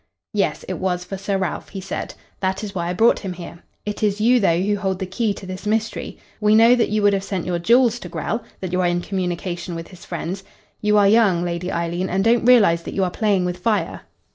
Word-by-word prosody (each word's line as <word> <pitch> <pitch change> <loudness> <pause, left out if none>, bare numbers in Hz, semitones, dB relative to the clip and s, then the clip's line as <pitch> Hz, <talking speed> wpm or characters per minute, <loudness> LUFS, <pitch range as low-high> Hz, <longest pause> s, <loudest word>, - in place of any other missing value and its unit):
"Yes, - - 0
it - - -4
was 180 -1 -1
for 195 - -5
Sir 195 +1 -2
Ralph," 185 -5 -3
he 195 - -6
said. 190 0 -5 0.2
"That 190 +1 -1
is 205 -2 -5
why 170 -3 -2
I - - -1
brought 225 +6 +4
him 190 -3 -5
here. 175 -1 -10 0.2
It 210 0 -4
is 210 -1 +1
you, 240 +3 +4
though, 170 -5 +3
who 205 +3 +1
hold 190 -2 -1
the 190 - -3
key 205 +4 -1
to 190 - -10
this 185 +2 -7
mystery. 220 +1 -2 0.2
We 210 0 +4
know 230 +2 +7
that 245 -2 +2
you 215 0 0
would 205 0 +5
have 195 -1 0
sent 190 -3 -3
your 175 -1 -1
jewels 240 +5 +4
to - - -8
Grell, 225 +1 -3 0.2
that 185 -2 -4
you 185 0 +1
are 180 - +2
in 175 0 0
communication 175 -2 -3
with 165 0 -7
his 185 -2 -14
friends. 180 +2 -5 0.4
You 210 0 +3
are 200 -1 +5
young, 200 -5 +4
Lady 175 +1 -3
Eileen, 170 +2 -2
and 190 +2 +1
don't 230 +1 +3
realise 210 -9 +5
that - - -7
you 195 - +1
are 180 - 0
playing 200 -4 +1
with 180 0 -3
fire. 210 +2 -1
190 Hz, 245 wpm, -21 LUFS, 180-210 Hz, 0.4 s, know